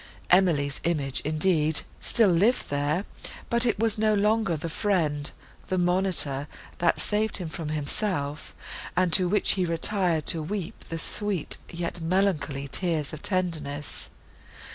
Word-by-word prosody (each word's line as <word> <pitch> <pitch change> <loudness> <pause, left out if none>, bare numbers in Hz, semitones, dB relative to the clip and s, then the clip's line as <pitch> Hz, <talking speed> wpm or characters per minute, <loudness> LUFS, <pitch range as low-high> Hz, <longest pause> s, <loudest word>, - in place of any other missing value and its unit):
Emily's 165 -7 +3
image, 145 -6 -1
indeed, 155 0 +2 0.2
still 225 -4 +3
lived 200 - +2
there; 145 +7 -1 0.5
but 235 +1 +4
it 225 - +1
was 220 0 +1
no 215 0 +2
longer 210 -4 +1
the 160 - -5
friend, 155 -5 -1 0.4
the 185 - -1
monitor, 175 -6 +1 0.3
that 170 -1 +2
saved 215 +1 0
him 180 - -5
from 160 -1 -5
himself, 150 0 -2 0.4
and 180 -2 +2
to 185 0 +6
which 210 - +2
he 185 - 0
retired 170 -1 0
to 165 - +1
weep 185 +2 -6
the 165 - -4
sweet, 195 +1 +3
yet 170 0 -5
melancholy, 165 -6 0
tears 160 -1 -1
of 155 - -8
tenderness. 155 -7 -3
170 Hz, 140 wpm, -26 LUFS, 150-195 Hz, 0.5 s, to